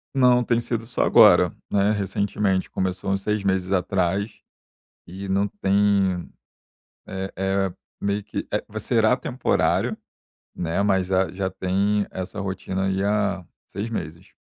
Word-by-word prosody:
Não 125 -2 +5
tem 120 0 +1
sido 115 -1 -3
só 125 - 0
agora, - - +6 0.2
né, 100 +1 +3
recentemente 100 -1 0
começou 95 +1 -2
uns 95 0 0
6 105 0 -1
meses 95 -1 0
atrás, 95 +2 0 0.7
e 95 +3 -8
não 100 +2 +1
tem, 100 -2 +1 0.8
é 95 0 -5
é 95 0 0 0.3
meio 100 +1 -1
que - - -5
é - - -1
será - - +2
temporário, - - 0 0.6
né, 85 +3 -1
mas 95 -2 +1
a 95 -1 +3
já - - -10
já 95 0 -2
tem 100 +3 0
essa 95 +3 -5
rotina 95 0 -3
aí 95 0 0
há 100 -3 0 0.2
6 105 +3 -5
meses. 85 -4 -6
95 Hz, 140 wpm, -24 LUFS, 95-105 Hz, 0.8 s, agora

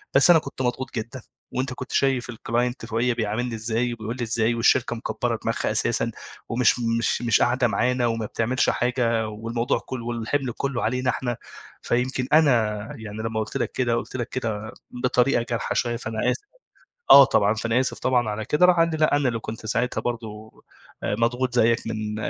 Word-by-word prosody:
بس - - +7
أنا 170 -2 +8
كنت 140 -3 -7
مضغوط 130 +1 -2
جدًا 120 +3 -5 0.3
وأنت 130 +1 -2
كنت 130 - -8
شايف 135 -3 +1
الclient 120 +1 -2
فوقيِّا 115 +2 0
بيعاملني 115 +1 -2
إزاي 115 +2 -1
وبيقول 115 0 -5
لي 125 - -3
إزاي، 115 0 +1
والشركة 120 +1 +2
مكبّرة 115 - -2
دماغها - - -1
أساسًا - - 0 0.4
ومش 120 +1 +2
مش 115 0 0
مش 115 -2 +2
قاعدة 125 0 +3
معانا 125 +1 +1
وما 115 -1 -2
بتعملش 120 +4 0
حاجة 120 -2 0
والموضوع 115 +3 -2
كُلّه 125 -3 -7
والحِمل 120 +3 -2
كُلّه 135 -3 -2
علينا 125 +2 0
إحنا، 120 -1 -2 0.4
فيمكن 125 +1 -1
أنا 155 -3 +6 0.5
يعني 110 -1 -8
لمّا 110 -1 -2
قُلت 110 - -3
لك - - -2
كده، 120 -2 0
قُلت 120 - -4
لك 120 -1 -3
كده 110 -3 -4 0.3
بطريقة 125 -1 +2
جارحة 115 - -2
شوية 120 -1 0
فأنا 110 -2 -1
آسف" 410 - -5 0.7
آه 140 - +11
طبعًا. 105 -6 +3
فأنا 115 +2 0
آسف 130 - -1
طبعًا 125 -4 +1
على 105 +1 -4
كده. 150 +9 +4
راح 180 0 +5
قال 165 - +4
لي: 160 - -2
"لأ 155 -1 +3
أنا 145 -2 +1
اللي 115 - -3
كنت 110 0 -7
ساعتها 115 +3 0
برضه 110 -2 -5 0.5
آآ - - 0
مضغوط 125 +2 0
زيّك 115 -1 +2
من 110 -1 -3
120 Hz, 185 wpm, -24 LUFS, 115-125 Hz, 0.7 s, آه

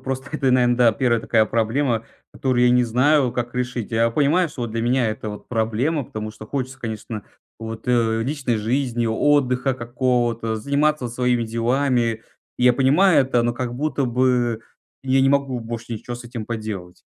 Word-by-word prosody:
просто 130 +1 -5
это, 140 -4 +1
наверно, 125 -1 +3
да, 120 -2 +5
1 120 -1 +1
такая 110 -1 +2
проблема, 115 +1 0 0.3
которую 125 -2 +1
я 125 - +5
не 125 0 +4
знаю, 130 +3 +2
как 120 0 -4
решить. 125 -3 -3
Я 115 0 +2
понимаю, 150 +8 +2
что 130 -4 -7
от 115 - -3
для 115 +1 -2
меня 120 0 +2
это 110 0 -4
вот 105 - -10
проблема. 125 +6 0
Потому 110 -1 -6
что 110 0 -11
хочется, 130 +1 -4
конечно, 110 -1 -6 0.3
вот, 115 +1 -7
э, 115 -2 +2
личной 135 -2 -1
жизни, 120 +1 -1
отдыха 130 +1 +2
какого-то, 120 -2 -1
заниматься 140 +2 0
своими 125 0 0
делами. 115 0 0 0.4
Я 125 0 +5
понимаю 145 +9 +4
это, 125 -3 +1
но 120 - 0
как 120 0 -4
будто 140 0 -1
бы 120 -2 +1 0.4
я 135 0 +2
не 135 - +4
могу 140 -2 +1
больше 115 +1 -6
ничего 115 +2 -6
с 120 - -11
этим 115 -3 -7
поделать. 105 -6 -5
120 Hz, 175 wpm, -22 LUFS, 115-130 Hz, 0.4 s, да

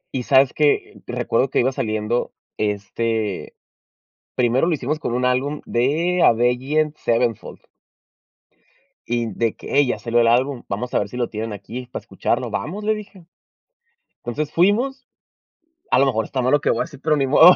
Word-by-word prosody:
Y 130 - 0
sabes 135 +1 +4
que 150 -1 +1
recuerdo 125 +3 0
que - - +1
iba 130 +2 +2
saliendo 110 0 -1 0.3
este, 105 0 -2 0.8
primero 125 +5 +2
lo 175 - +2
hicimos 150 +2 -2
con 120 - -3
un 125 +1 0
álbum 135 +4 0
de 160 +9 +1
Avenged 130 +6 +2
Sevenfold. 115 -2 -1 1.5
Y 120 -1 -1
de 115 -2 0
que: - - -8
"Ey 140 -2 +5
ya - - -1
salió 120 0 +1
el 115 - +4
álbum, 125 +2 +2
vamos 120 +5 -3
a - - +3
ver 100 - -2
si 125 - -7
lo 120 -1 -1
tienen 110 0 -4
aquí 115 +5 -7
para - - -5
escucharlo", - - -2
"vamos", 200 +7 -4
le 215 0 +2
dije. 200 -4 -11 0.9
Entonces 145 +5 -4
fuimos, 245 +9 +2 0.9
a - - +5
lo 140 - +5
mejor 110 -5 0
está 130 - -2
mal 125 +1 +1
lo 145 - +5
que - - 0
voy - - +1
a - - +2
decir, 145 -5 -12
pero 155 - +2
ni 135 -1 +1
modo. 160 +6 +8
125 Hz, 180 wpm, -21 LUFS, 115-150 Hz, 1.5 s, modo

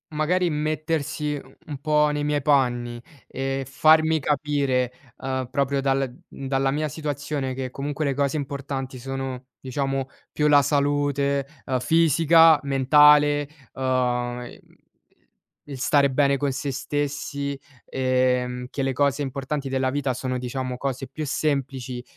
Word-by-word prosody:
magari 175 +4 +1
mettersi 155 0 -2
u 135 -2 -11
un 145 -3 -5
po' 150 0 +3
nei 150 0 -2
miei 145 0 0
panni 120 -4 +1 0.3
e 135 0 -3
farmi 155 +3 +4
capire, 140 -4 0 0.3
uhm, 130 -1 -3
proprio 140 0 0
dal 135 -1 0 0.2
dalla 135 0 -1
mia 150 +2 -1
situazione 145 -2 -3
che 130 0 -4
comunque 140 +3 -4
le 140 -2 0
cose 140 +2 0
importanti 140 -2 -5
sono, 135 0 -5
diciamo 135 0 -2 0.2
più 150 - +1
la 145 -1 +6
salute, 140 -1 +1 0.2
uhm, 130 - 0
fisica, 165 +2 +5
mentale, 145 +2 +5 0.3
uhm, 125 -2 -1
i 120 - -11 1.1
il 140 -2 -7
stare 140 +1 +3
bene 140 +1 +2
con 140 0 -1
sé 140 +2 -3
stessi, 140 +1 -3 0.3
ehm, 125 -1 0
che 140 - -3
le 135 0 0
cose 140 +1 +1
importanti 140 +1 -3
della 130 0 0
vita 140 -2 -1
sono 130 0 -3
diciamo 125 0 -4
cose 135 0 -3
più 155 +2 -5
semplici, 135 -4 -2
140 Hz, 135 wpm, -24 LUFS, 130-145 Hz, 1.1 s, la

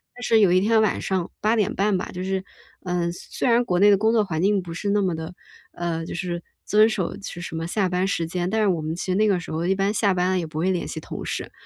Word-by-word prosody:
但 245 - -9
是 225 -1 +4
有 195 -4 +5
一 185 - +5
天 220 +2 +3
晚 215 - +1
上 185 -3 -1
8:30 210 -3 +1
吧， - - -5
就 180 0 -5
是， 190 0 -2 0.4
嗯， 175 -2 -1
虽 - - -11
虽 - - -2
然 240 0 +4
国 180 -6 0
内 205 +2 +6
的 200 - +5
工 220 +1 +3
作 220 -2 +3
环 160 -3 -2
境 200 +1 +3
不 170 -1 -7
是 200 +4 -3
那 205 0 +2
么 180 -3 0
的 160 +2 -6 0.4
呃， 165 -1 -3
就 - - -6
是 175 -1 -3 0.2
遵 215 +1 +5
守 190 -5 -2
其 195 -3 -8
什 165 - -6
么 165 +1 -3
下 195 +1 0
班 180 +1 0
时 170 -4 -1
间。 175 +2 -2
但 220 +1 0
是 - - +3
我 170 -4 +1
们 155 +2 -3
其 175 - -5
实 - - +1
那 215 +2 +3
个 195 -3 +2
时 170 - -8
候， 165 +2 -1
一 190 - +2
般 195 +1 +1
下 200 -3 +2
班 180 +1 +1
了 185 - +1
也 165 - -3
不 155 0 -8
会 180 +4 +1
联 180 - -2
系 160 - -5
同 - - -7
事。 - - -4
185 Hz, 310 characters per minute, -24 LUFS, 175-205 Hz, 0.4 s, 内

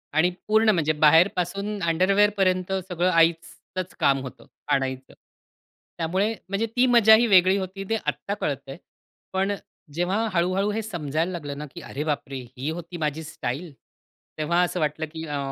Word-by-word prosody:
आणि 170 +3 +4 0.2
पूर्ण 220 +1 +4
म्हणजे 160 -6 +2
बाहेर 165 +5 +7
पासून 200 +3 -3
अंडरवेअर 190 +5 +3
पर्यंत 185 -1 +1 0.2
सगळं 180 +1 +1
आईचंच 165 +2 0
काम 135 -1 +3
होतं 130 - -10 0.3
आणायचं. 130 -1 -2 0.8
त्यामुळे 185 +6 0 0.2
म्हणजे 200 +3 0
ती 250 +1 +4
मजा 225 -3 +7
ही 235 +2 +3
वेगळी 190 -1 +5
होती 195 +1 -5
ते 225 - +2
आत्ता 200 - -2
कळतं 140 -8 -4
आहे. 135 - -8 0.6
पण 195 +2 +1 0.4
जेव्हा 185 +7 0
हळू-हळू 185 +4 +1
हे 220 +2 -2
समजायला 165 -4 -2
लागलं 145 -5 -6
ना, 150 - -5
की - - -7
अरे 145 +3 -5
बापरे! 140 -3 -3 0.2
ही 140 +4 -3
होती 170 +1 -6
माझी 155 0 -2
स्टाईल 150 +1 -5 0.6
तेव्हा 170 +3 +1
असं 180 0 -2
वाटलं 155 +1 -1
की 160 0 -6
अ 145 -1 -3
175 Hz, 160 wpm, -25 LUFS, 155-195 Hz, 0.8 s, बाहेर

